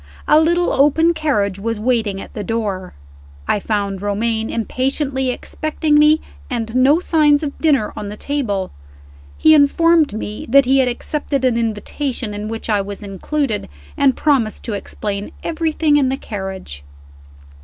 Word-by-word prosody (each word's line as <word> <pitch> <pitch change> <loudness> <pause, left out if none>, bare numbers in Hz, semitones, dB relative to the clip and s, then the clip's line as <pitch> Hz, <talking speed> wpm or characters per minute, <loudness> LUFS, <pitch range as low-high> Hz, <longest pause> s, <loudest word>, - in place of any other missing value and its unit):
A 305 - +6
little 345 +2 +2
open 320 +5 +4
carriage 205 - 0
was 225 +1 -3
waiting 220 -4 0
at - - -10
the 210 - -5
door. 205 - -3 0.5
I - - +1
found 200 -2 -2
Romayne 220 +2 -1
impatiently 265 +3 -1
expecting 305 +3 0
me, 305 +1 +5 0.3
and 230 -3 -3
no 270 +5 +5
signs 305 -4 +3
of 285 -2 -3
dinner 280 -9 +2
on 210 - -5
the 210 - -8
table. 210 -11 -2 0.7
He 315 - +6
informed 310 0 +4
me 215 0 -5
that 275 +2 +6
he 270 +2 +3
had 260 - +3
accepted 275 +2 -2
an 250 -2 +2
invitation, 230 +1 -3
in 205 +1 -5
which 225 0 -5
I 210 -3 +2
was 200 +1 -7
included, 215 +5 -3 0.3
and 275 -2 +2
promised 265 -8 +1
to 230 - -4
explain 205 0 -5
everything 315 -2 +1
in 270 -3 +2
the 265 - -1
carriage. 190 - -7
250 Hz, 155 wpm, -19 LUFS, 210-295 Hz, 0.7 s, A